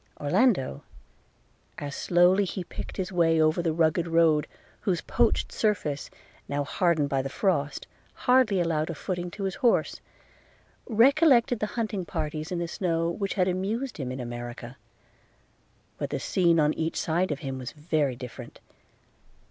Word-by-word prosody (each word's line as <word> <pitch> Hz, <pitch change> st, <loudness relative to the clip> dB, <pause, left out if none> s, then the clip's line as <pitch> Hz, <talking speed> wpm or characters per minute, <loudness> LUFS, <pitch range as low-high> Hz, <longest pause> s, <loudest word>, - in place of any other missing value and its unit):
Orlando, 180 Hz, -, +2 dB, 1.0 s
as 145 Hz, -1 st, -5 dB
slowly 180 Hz, +3 st, +4 dB
he 190 Hz, 0 st, -4 dB
picked -, -, -8 dB
his 190 Hz, -1 st, -3 dB
way 165 Hz, -3 st, +3 dB
over 155 Hz, +2 st, +3 dB
the 170 Hz, -1 st, 0 dB
rugged 165 Hz, +1 st, +1 dB
road, 165 Hz, -2 st, +3 dB, 0.3 s
whose 180 Hz, -4 st, -1 dB
poached -, -, +1 dB
surface, 185 Hz, -10 st, -1 dB, 0.4 s
now 145 Hz, 0 st, -1 dB
hardened 160 Hz, -1 st, +1 dB
by 135 Hz, -1 st, 0 dB
the 135 Hz, -, -4 dB
frost, 145 Hz, 0 st, -1 dB, 0.4 s
hardly 250 Hz, -6 st, +4 dB
allowed 160 Hz, -2 st, 0 dB
a 165 Hz, -, -4 dB
footing 175 Hz, +2 st, -4 dB
to 200 Hz, +3 st, -7 dB
his 190 Hz, -1 st, -1 dB
horse, 240 Hz, -, +2 dB, 0.9 s
recollected 245 Hz, 0 st, +4 dB
the 215 Hz, -, -1 dB
hunting 215 Hz, -4 st, -1 dB
parties 155 Hz, 0 st, -4 dB
in 180 Hz, -, -1 dB
the 170 Hz, 0 st, -2 dB
snow, 165 Hz, -1 st, -1 dB
which 195 Hz, +2 st, -3 dB
had 185 Hz, -2 st, +2 dB
amused 205 Hz, +8 st, -2 dB
him 130 Hz, -5 st, -4 dB
in 130 Hz, -, -5 dB
America; 120 Hz, 0 st, -7 dB, 1.2 s
but -, -, -2 dB
the -, -, -2 dB
scene 170 Hz, -3 st, +2 dB
on 150 Hz, 0 st, +3 dB
each 160 Hz, 0 st, -2 dB
side 170 Hz, +2 st, 0 dB
of 145 Hz, -, -3 dB
him 135 Hz, -3 st, -4 dB
was 125 Hz, -, -6 dB
very 150 Hz, -3 st, -1 dB
different. 125 Hz, -2 st, -9 dB
170 Hz, 155 wpm, -27 LUFS, 150-190 Hz, 1.2 s, slowly